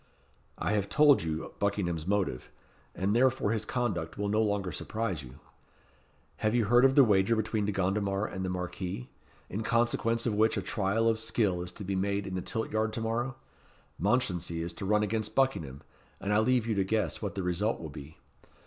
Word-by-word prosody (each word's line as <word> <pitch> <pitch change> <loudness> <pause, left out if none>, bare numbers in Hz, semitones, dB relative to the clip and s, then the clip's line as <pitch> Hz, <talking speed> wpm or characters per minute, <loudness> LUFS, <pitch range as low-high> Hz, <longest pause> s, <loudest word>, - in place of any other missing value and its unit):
"I - - -1
have 105 -2 0
told 150 -2 +5
you 80 -1 -4
Buckingham's 90 -5 -1
motive, 95 -11 -1 0.5
and 100 +3 0
therefore 130 -3 +3
his 110 -1 -1
conduct 105 -12 -2
will 100 0 -1
no 105 +2 +2
longer 100 -4 0
surprise 110 -8 -3
you. 65 -2 -12 1.0
Have 110 +2 0
you 120 -3 +3
heard 120 +5 +5
of 135 0 +4
the 140 - +8
wager 105 -1 +3
between 110 -1 -1
De 105 - 0
Gondomar 100 +1 0
and 95 -3 -5
the 95 - -2
Marquis, 90 +5 -4 0.4
in 105 - -4
consequence 115 0 +1
of 115 - +1
which 110 +2 +2
a - - 0
trial 110 +1 0
of 110 -1 +2
skill 110 -5 +1
is 90 0 -5
to - - -8
be 95 0 -2
made 100 +1 0
in 95 - -5
the 90 - -2
Tilt 110 +4 -3
yard 110 0 0
to 115 - -3
morrow? 120 +3 -1 0.6
Mounchensey 90 -9 0
is 85 0 -4
to 95 - -6
run 105 +2 +3
against 110 +1 -2
Buckingham, 80 - 0 0.4
and 100 +1 -1
I 105 - +4
leave 120 +1 +2
you 115 - 0
to 100 -2 +1
guess 110 +2 -1
what 100 -4 -4
the 95 - -2
result 90 +5 0
will 80 - -6
be. 75 +1 -10
105 Hz, 200 wpm, -30 LUFS, 95-115 Hz, 1.0 s, the